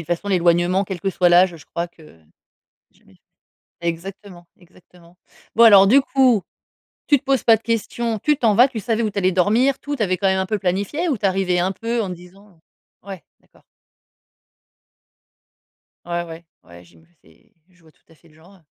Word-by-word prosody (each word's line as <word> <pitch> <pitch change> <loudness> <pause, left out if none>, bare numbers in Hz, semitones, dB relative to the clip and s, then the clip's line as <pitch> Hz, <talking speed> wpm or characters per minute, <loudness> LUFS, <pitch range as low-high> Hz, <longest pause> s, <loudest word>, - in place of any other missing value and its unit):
toute 175 0 -1
façon, 205 - -10
l'éloignement, 175 +1 +1
quel 190 -1 -6
que 195 +2 -2
soit 180 -1 +2
l'âge, 175 0 +4
je 155 - -17
crois 170 +1 -5
que 155 - -19 0.7
jamais - - -26 0.7
exactement, 175 +1 -7
exactement. 175 -1 -22 0.4
Bon, 230 - +4
alors, 200 -4 +8
du 260 +8 +5
coup, 260 -7 +2 0.6
tu 285 -3 +3
te - - -35
poses 270 -1 0
pas 225 -2 +5
de 220 - -10
questions, 230 0 -3
tu 300 +4 0
t'en 220 -6 +1
vas. 245 +4 +6
Tu 235 -4 -7
savais 230 +1 -2
où 215 - -2
tu 200 - -3
allais 185 0 +1
dormir, 225 +9 +1
tout? 290 0 -6
Tu 235 - -7
avais 185 -3 0
quand 195 - 0
même 190 0 +1
un 190 - -2
peu 215 +2 -2
planifié 200 - -2
ou 265 - -1
tu 200 - -4
arrivais 185 -2 0
un 185 +2 0
peu 230 +4 -3
en 195 - -4
te - - -5
disant, 190 +4 -18 0.5
heu 200 - -23
ouais, 190 -7 -9 0.2
d'accord. - - -28 2.4
Ouais, 175 0 -3
ouais. 165 0 -12 0.2
Ouais, 85 0 -16
j'ima 85 -1 -23 0.2
c'est 80 +2 -26 0.2
je 180 -2 -29
vois 160 - -22
tout - - -37
à 165 - -21
fait 165 - -25
le 155 - -25
genre. 175 +3 -21
190 Hz, 200 wpm, -20 LUFS, 175-220 Hz, 2.4 s, alors